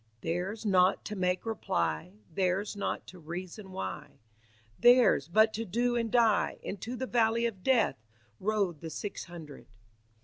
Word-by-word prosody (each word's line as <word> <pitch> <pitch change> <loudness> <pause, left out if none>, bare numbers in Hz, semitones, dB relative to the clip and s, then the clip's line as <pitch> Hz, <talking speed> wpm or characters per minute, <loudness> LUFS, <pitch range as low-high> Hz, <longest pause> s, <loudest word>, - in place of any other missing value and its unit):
"Theirs 185 +7 -3
not 185 -2 +3
to 210 - -4
make 180 0 0
reply, 85 - -1 0.2
Theirs 190 +4 0
not 200 - -3
to 185 - -12
reason 180 +4 -7
why, 95 - -6 0.6
Theirs 240 - +6
but 215 +5 +4
to 225 - -2
do 240 +4 0
and 230 -2 -1
die: 230 -4 +3
Into 215 +5 -5
the 260 - -3
valley 235 -1 +2
of 210 -5 -3
Death 225 - +2 0.4
Rode 195 -6 0
the 165 - -5
six 200 +5 -5
hundred." 160 -5 -11
200 Hz, 145 wpm, -30 LUFS, 175-225 Hz, 0.6 s, Theirs